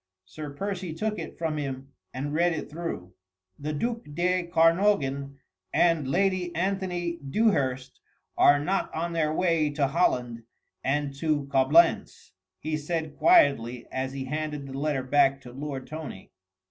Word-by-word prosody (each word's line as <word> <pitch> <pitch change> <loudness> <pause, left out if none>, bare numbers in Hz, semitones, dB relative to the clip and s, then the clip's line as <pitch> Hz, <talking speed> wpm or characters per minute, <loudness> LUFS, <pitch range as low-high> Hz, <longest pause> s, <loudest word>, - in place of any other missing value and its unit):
Sir 150 +9 -8
Percy 180 +2 -4
took 215 +4 -2
it - - -7
from 160 -2 -2
him 135 -2 -5 0.2
and 145 +3 -4
read 170 +2 +2
it 150 - -5
through: 150 - -5 0.5
"The 150 +2 -3
duc 230 +10 -2
de 180 +1 +1
Kernogan 165 -5 +2 0.3
and 165 -5 +3
Lady 185 +3 +1
Anthony 180 -2 -1
Dewhurst 135 - 0 0.4
are 145 - +6
not 185 +7 -1
on 170 +2 -2
their 155 -2 +1
way 165 -2 +2
to 145 -1 0
Holland 125 -6 0 0.4
and 145 +1 0
to 150 -2 0
Coblentz," 145 +5 +3 0.3
he 155 +8 -3
said 155 0 -3
quietly 125 - +4
as 130 0 -3
he 135 -1 -4
handed 150 0 -3
the 135 - -8
letter 140 -1 -1
back 135 +1 +3
to 125 - -11
Lord 135 -1 -5
Tony. 155 -11 -8
150 Hz, 145 wpm, -27 LUFS, 135-175 Hz, 0.5 s, are